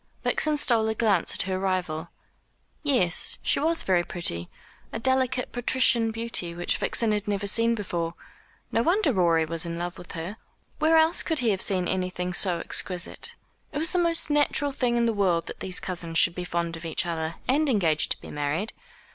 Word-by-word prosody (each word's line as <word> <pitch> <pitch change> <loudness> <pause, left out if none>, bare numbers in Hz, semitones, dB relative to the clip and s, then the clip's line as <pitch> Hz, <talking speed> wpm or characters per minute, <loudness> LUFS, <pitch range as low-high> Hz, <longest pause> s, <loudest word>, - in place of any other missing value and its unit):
Vixen 305 -1 +2
stole 230 -6 +4
a 220 - -1
glance 210 -7 +1
at - - +1
her 185 0 -2
rival. 180 -4 -2 0.7
Yes, 245 - +2
she - - +2
was 325 +3 +2
very 180 -2 +2
pretty 85 - -3 0.4
a - - -4
delicate 260 +1 0
patrician 245 -1 +2
beauty 225 -7 -2
which 175 0 -1
Vixen 230 -2 +1
had 210 -1 -1
never 205 0 -1
seen 230 +3 +3
before. 170 -5 -3 0.6
No 230 - +2
wonder 340 - +2
Rorie 170 -4 +3
was 165 +1 -1
in 170 -1 -4
love 175 +1 -5
with 175 - -10
her. 175 +5 -6 0.4
Where 320 +1 +4
else 320 +1 +4
could 320 - -2
he 240 -4 +2
have 190 - -2
seen 185 -3 +2
anything 180 -1 -2
so 180 -1 +1
exquisite? 180 +1 -2 0.4
It - - -5
was 320 +2 0
the 360 - +2
most 335 -2 +1
natural 290 -1 +2
thing 245 -3 0
in 235 - +2
the 230 - +1
world 185 -5 +1
that - - -8
these 185 -1 0
cousins 170 -3 -4
should 170 - +4
be 180 0 -5
fond 170 -1 -2
of 165 - -10
each 165 +2 -1
other, 165 -1 -3
and 290 +3 +2
engaged 160 - +2
to - - -22
be - - -10
married. 150 +9 -2
190 Hz, 195 wpm, -26 LUFS, 170-245 Hz, 0.7 s, stole